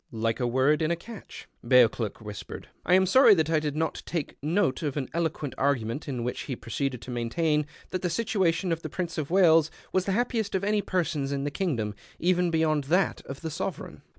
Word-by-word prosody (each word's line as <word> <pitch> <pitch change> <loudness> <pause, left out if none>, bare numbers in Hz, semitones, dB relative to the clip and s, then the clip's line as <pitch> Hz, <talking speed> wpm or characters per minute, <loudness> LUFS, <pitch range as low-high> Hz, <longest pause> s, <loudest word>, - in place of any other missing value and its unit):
(" - - -43 0.2
Like 115 - 0
a 125 - +1
word 130 +5 +2
in 155 - +1
a 170 - +2
catch,'' 215 +5 -11 0.2
Bcauclcrk 120 -3 +3
whispered.) 105 -1 -8 0.2
I 180 - +6
am 190 0 +5
sorry 260 +3 +7
that 160 -2 +1
I 160 - +4
did 150 -2 -3
not 160 +1 -1
take 165 -5 -3
note 160 -2 +1
of 150 -3 -2
an 140 - -1
eUxiucnt 160 -4 -2
argument 130 -1 0
in 125 -4 -3
which 125 - -3
he 130 - -1
proceeded 125 +2 -3
to 130 - -7
maintain 150 +6 0 0.2
that 185 - -2
the 180 - 0
situation 185 -3 0
of 165 0 -1
Prince 170 +1 -4
of 145 - -3
Wales 165 -4 +5 0.2
was 185 -1 +2
the 195 - 0
hajopiest 225 -2 0
of 190 - 0
any 210 +1 +2
person's 160 -8 -1
in 140 -1 -2
the 145 - -2
kingdom, 130 - -1 0.2
even 180 0 +2
beyond 155 -3 +1
that 180 +7 +1
of 135 - -7
the 160 -1 -4
Sovereign. 180 +1 -5
160 Hz, 210 wpm, -27 LUFS, 135-180 Hz, 0.2 s, sorry